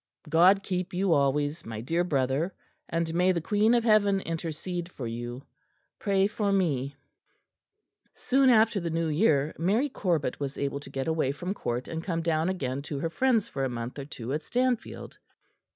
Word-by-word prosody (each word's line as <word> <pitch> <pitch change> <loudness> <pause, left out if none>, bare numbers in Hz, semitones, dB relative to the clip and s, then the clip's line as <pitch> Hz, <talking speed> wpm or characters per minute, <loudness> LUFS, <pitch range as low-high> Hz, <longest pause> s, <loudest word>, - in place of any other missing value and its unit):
God 180 +5 +5
keep 185 0 -3
you 185 -1 +2
always, 145 +2 +1
my 110 -1 -6
dear 165 +10 0
Brother; 140 +2 0 0.3
and 165 0 -1
may 180 +2 +3
the 170 - 0
Queen 210 +7 +2
of 235 - +2
Heaven 205 -3 +4
intercede 170 +1 -4
for 130 - -6
you. 120 +3 -5 0.6
Pray 195 -1 +2
for 205 -1 0
me." 145 -8 0 1.2
Soon 265 0 +2
after 225 -3 +4
the 170 -2 -3
New 165 0 -1
Year, 150 -3 +2
Mary 215 - +2
Corbet 170 - -1
was 140 -1 -4
able 140 0 -2
to 140 - -11
get 135 -1 -3
away 160 -4 +1
from 180 +7 -4
Court 120 -9 -3
and 165 0 -5
come 165 -3 -2
down 165 +1 +1
again 140 -7 -2
to 145 0 -5
her 160 +4 -2
friends 245 -1 +2
for 135 - -4
a 135 - 0
month 120 +3 -5
or 140 - -5
two 130 -2 -6
at 150 - -1
Stanfield. 250 +6 -2
165 Hz, 180 wpm, -28 LUFS, 140-195 Hz, 1.2 s, God